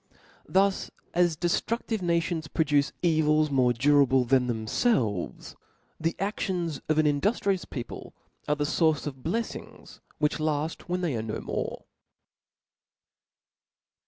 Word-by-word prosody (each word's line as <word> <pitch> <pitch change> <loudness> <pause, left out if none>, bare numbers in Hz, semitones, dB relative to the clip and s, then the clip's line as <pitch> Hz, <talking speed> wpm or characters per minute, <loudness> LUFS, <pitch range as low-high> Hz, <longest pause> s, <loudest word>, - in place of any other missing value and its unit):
Thus, 195 +1 +2 0.2
as 175 -2 +2
deftruftive 220 +5 -1
nations 170 -2 0
produce 145 -3 +1
evils 155 -2 +3
more 130 -3 +4
durable 135 0 +4
than 130 0 +3
themfelves; 110 - -1 0.4
the 165 +1 -1
aftions 185 -5 -2
of 155 - +2
an 155 - +4
in 145 -1 +2
duftrious 200 -3 0
people 120 -4 -7 0.3
are 150 - +2
the 145 - -1
fource 160 0 +2
of 140 -3 -5
bleffings 225 - -5 0.2
which 150 0 0
|all 155 0 0 0.2
when 180 +1 -1
they 165 -7 0
are 110 - -1
no 110 -1 -4
more. - - -4
155 Hz, 125 wpm, -27 LUFS, 140-175 Hz, 0.4 s, more